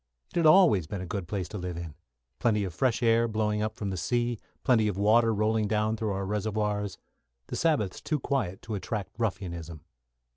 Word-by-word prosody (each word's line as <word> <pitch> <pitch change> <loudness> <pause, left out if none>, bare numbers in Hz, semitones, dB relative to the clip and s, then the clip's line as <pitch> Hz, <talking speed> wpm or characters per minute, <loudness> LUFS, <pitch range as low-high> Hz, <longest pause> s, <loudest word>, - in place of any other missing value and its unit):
It - - -18
had 165 - +2
always 155 - +6
been 95 +2 -4
a - - -4
good 90 0 -4
place 95 -1 -3
to 105 - -5
live 90 -1 -4
in 85 -3 -6 0.5
plenty 105 -3 +2
of 95 -3 -4
fresh 125 +3 +1
air 115 0 +4
blowing 105 -1 0
up 110 0 -2
from 100 -2 -3
the 95 - -3
sea 120 +6 0 0.2
plenty 110 -4 +4
of 100 -3 -2
water 115 +3 +4
rolling 110 0 +1
down 110 +1 +1
through 110 -2 -2
our 95 0 -2
reservoirs 105 0 -1 0.5
the - - -3
Sabbaths 145 - +1
too 155 -2 -1
quiet 125 -10 -2
to 110 - -5
attract 100 +1 -3
ruffianism. 85 -7 -3
105 Hz, 195 wpm, -28 LUFS, 95-115 Hz, 0.5 s, always